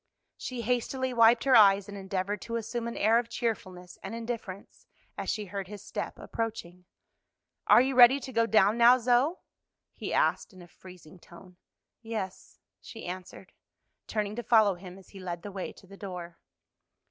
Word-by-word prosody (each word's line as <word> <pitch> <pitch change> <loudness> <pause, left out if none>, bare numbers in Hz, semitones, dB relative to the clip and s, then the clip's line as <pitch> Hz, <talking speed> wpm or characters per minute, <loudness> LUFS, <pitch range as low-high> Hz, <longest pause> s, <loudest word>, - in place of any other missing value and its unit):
She 250 -2 -6
hastily 250 +2 -1
wiped 230 0 +5
her 265 -2 +4
eyes 200 -2 +6
and 205 - -8
endeavored 195 +1 -3
to 230 - -5
assume 230 +1 -3
an 235 - -6
air 225 +3 +4
of 235 -1 -5
cheerfulness 185 -7 -4
and 195 +4 -6
indifference, 230 -4 -7 0.3
as - - -5
she 210 -1 -2
heard 195 0 -6
his 205 0 -10
step - - -5
approaching. 180 -6 -6 0.8
"Are 215 +3 +7
you 265 +1 0
ready 255 +2 +7
to 260 +1 -8
go 230 0 +2
down 220 0 +3
now, 240 +2 +7
Zoe?" 250 +6 +2 0.6
he - - -6
asked - - +1
in 185 -1 -13
a - - -15
freezing 180 -1 -15
tone. 180 +1 -16 0.4
"Yes," 220 -5 -6 0.2
she 225 - -10
answered, 185 +1 -8 0.6
turning 210 -1 -2
to - - -2
follow 220 -3 +4
him 180 +1 -11
as 190 - -17
he 195 - -12
led 175 -2 -6
the 205 - -7
way 190 -1 -5
to - - -18
the 195 +1 -14
door. 180 -4 -8
210 Hz, 175 wpm, -29 LUFS, 185-235 Hz, 0.8 s, Are